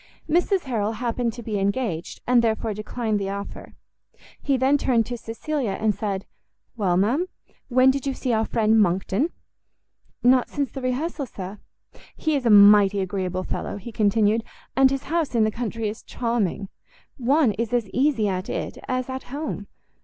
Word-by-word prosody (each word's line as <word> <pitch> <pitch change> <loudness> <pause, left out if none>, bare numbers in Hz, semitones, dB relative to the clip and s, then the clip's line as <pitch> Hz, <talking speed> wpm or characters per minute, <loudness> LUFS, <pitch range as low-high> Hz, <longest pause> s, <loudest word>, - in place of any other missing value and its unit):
Mrs 355 +4 +2
Harrel 225 -6 -1
happened 235 +1 -1
to 240 0 -8
be 210 -2 -2
engaged, 195 -4 -2
and 245 -1 +4
therefore 220 -1 0
declined 215 +1 -2
the 195 -1 -2
offer. 200 0 -7 0.7
He 275 -2 +1
then 265 +3 +3
turned 235 -5 +2
to 245 - -4
Cecilia, 235 +1 -3
and 220 -1 +2
said, 195 -2 -3 0.5
"Well, 190 -6 +1
ma'am, 250 - +2 0.4
when 255 +1 +5
did 275 0 -3
you 270 - -1
see 250 -3 -1
our 220 0 +2
friend 220 0 +2
Monckton?" 195 - +1 0.9
"Not 250 0 +4
since 280 -3 -2
the 270 - -6
rehearsal, 270 +3 -2
sir." 195 0 -8 0.6
"He 315 -2 0
is 260 -4 0
a - - +4
mighty 205 -1 +7
agreeable 185 -1 -2
fellow," - - -4
he 220 +4 -8
continued, 215 +1 +2 0.3
"and 270 0 +6
his 275 0 -2
house 325 -5 -1
in 225 - +4
the 215 - +2
country 230 -1 -3
is 210 +2 -5
charming. 220 -5 -2 0.5
One 270 0 +3
is 230 +2 -3
as 240 -3 +1
easy 255 -5 +2
at 185 -1 -2
it - - -4
as 255 -1 -1
at 260 0 -5
home. 275 -6 -5
230 Hz, 170 wpm, -24 LUFS, 205-260 Hz, 0.9 s, mighty